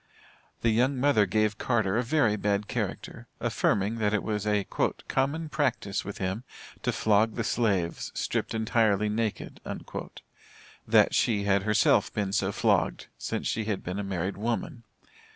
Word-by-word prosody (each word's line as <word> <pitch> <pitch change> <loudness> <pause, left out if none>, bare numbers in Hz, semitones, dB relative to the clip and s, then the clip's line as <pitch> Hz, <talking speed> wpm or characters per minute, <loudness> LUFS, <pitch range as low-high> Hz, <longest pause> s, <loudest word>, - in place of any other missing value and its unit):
The 115 - +3
young 130 +5 +2
mother 125 -6 +3
gave 110 +2 +1
Carter 110 -5 +1
a 120 - +3
very 120 -4 +2
bad 105 0 0
character, - - -4
affirming, 105 +3 +1
that 105 0 +2
it 100 - -1
was 105 -1 -2
a 105 -1 +2 0.4
"common 145 +5 0
practice 130 -10 -1
with 100 - -6
him 95 +5 -2 0.4
to - - 0
flog 110 +1 +2
the 115 - -1
slaves, 100 -7 0
stripped - - -2
entirely 110 -2 +2
naked" 110 0 -3 1.3
that - - +5
she 105 -4 +2
had 100 -1 +2
herself 105 +1 +3
been 100 -2 -2
so - - +1
flogged, - - +1
since - - -3
she 110 -1 -1
had 105 -3 -2
been 90 +3 -4
a - - -2
married 95 0 -3
woman. 115 +2 -3
105 Hz, 150 wpm, -28 LUFS, 100-115 Hz, 1.3 s, that